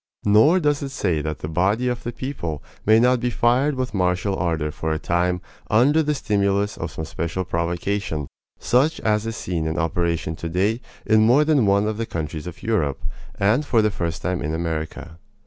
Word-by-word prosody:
Nor 110 - +5
does 145 -3 +1
it 140 - -3
say 90 - -1
that 75 0 -3
the - - -3
body 95 +9 +1
of 125 -1 -1
the 120 - -4
people 100 - -5 0.2
may 110 +1 +6
not 125 +1 +4
be 125 +1 0
fired 125 +5 +2
with 130 -2 -3
martial 95 +1 0
ardor 80 -3 -1
for 80 +1 -3
a 80 - 0
time 90 +2 0 0.3
under 135 +9 +4
the 150 -1 0
stimulus 100 -4 0
of 85 - -4
some 80 +1 -6
special 85 +4 -3
provocation, 85 -1 -2 0.3
such 135 +6 +2
as 105 0 +1
is 115 - -3
seen 85 -5 -2
in 80 +2 -2
operation 85 -1 -1
today 95 +9 -1 0.2
in 110 0 +4
more 140 +6 +5
than 145 -8 +3
one 100 +1 +3
of 110 -1 -2
the 115 0 -3
countries 80 0 -4
of 85 - -9
Europe, 80 -12 0 0.4
and 105 +9 +3
for 115 -6 +2
the 105 - +2 0.2
time 90 +3 -3
in 75 +2 -2
America. 80 0 -4
100 Hz, 190 wpm, -22 LUFS, 85-120 Hz, 0.4 s, may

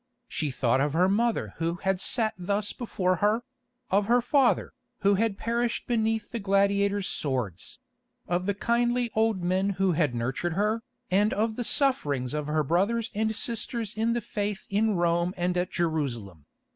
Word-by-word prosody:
She 150 - -2
thought 130 0 +1
of 145 0 0
her 180 +3 +4
mother 205 - 0
who 165 +1 -1
had 190 0 -1
sat 225 -1 +1
thus 200 +3 -2
before 185 -7 -1
her; 215 +5 +2 0.5
of 200 +1 +2
her 240 +2 +5
father, 265 +1 +2 0.3
who 200 0 +4
had 205 0 +1
perished 235 +1 -1
beneath 225 -2 0
the 235 - -3
gladiators' 200 0 +2
swords; 125 - -3 0.5
of 180 +2 -1
the 200 - +1
kindly 240 +2 +1
old 220 -4 +1
men 185 +3 +1
who 195 -1 +2
had 150 -6 +1
nurtured 130 +8 -2
her, 210 +5 0 0.3
and 205 +3 +3
of 220 +1 0
the 245 - -2
sufferings 145 - +1
of 150 -1 -2
her 155 0 +1
brothers 200 +9 +1
and 220 +1 0
sisters 230 -1 -2
in 225 +2 +1
the 240 - -1
faith 205 -2 -3
in 210 +1 +2
Rome 175 +1 +1
and 180 0 0
at 180 0 0
Jerusalem. 120 - -3
200 Hz, 170 wpm, -27 LUFS, 170-225 Hz, 0.5 s, her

